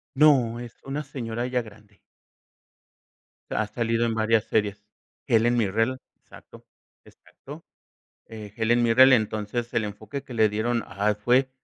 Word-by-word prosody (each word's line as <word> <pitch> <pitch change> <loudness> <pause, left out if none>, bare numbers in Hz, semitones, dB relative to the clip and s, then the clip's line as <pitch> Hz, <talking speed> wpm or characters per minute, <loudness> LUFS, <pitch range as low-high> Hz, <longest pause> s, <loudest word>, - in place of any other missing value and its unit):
No, 130 -6 +4
es 120 -1 -9
una 140 +2 -4
señora 120 -4 -5
ya 125 -1 -1
grande. 105 -2 -17 1.5
Ha 110 - -1
salido 115 +1 -1
en 115 -1 -1
varias 110 0 +2
series, 105 -1 -1 0.4
Helen 120 -1 +3
Mirrell, 115 +4 0 0.2
exacto, - - -17 0.4
exacto, - - -14 0.6
eh, 105 -2 -10
Helen 120 +1 +2
Mirrell, 130 +3 +6
entonces 110 +1 -1
el 110 -2 0
enfoque 110 +6 -7
que 130 - -11
le 110 -2 +3
dieron 115 +3 -1
a 100 +2 -2
él 105 - +1
fue, 125 +5 +2
115 Hz, 140 wpm, -25 LUFS, 110-125 Hz, 1.5 s, Mirrell